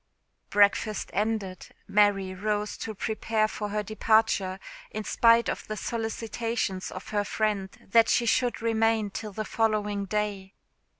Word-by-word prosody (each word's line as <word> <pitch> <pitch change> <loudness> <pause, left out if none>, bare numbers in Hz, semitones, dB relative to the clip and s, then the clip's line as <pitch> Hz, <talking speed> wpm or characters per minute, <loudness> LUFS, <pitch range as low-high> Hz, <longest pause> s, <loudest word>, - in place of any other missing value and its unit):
Breakfast 205 +1 +2
ended, 210 -3 -2 0.2
Mary 200 -2 +3
rose 210 +2 -2
to 220 - -5
prepare 220 +1 0
for 210 -1 -5
her 210 +1 -1
departure, 215 -3 +1 0.3
in 215 - -5
spite 230 +1 +4
of - - -3
the 215 - -4
solicitations 225 -3 -3
of 185 - -8
her 205 -1 0
friend 205 -2 -1 0.2
that 230 0 +5
she 240 - +3
should 240 0 +1
remain 225 -2 +1
till 215 +1 -5
the 215 +2 -4
following 210 -3 0
day. 200 -1 -3
215 Hz, 135 wpm, -27 LUFS, 200-225 Hz, 0.3 s, that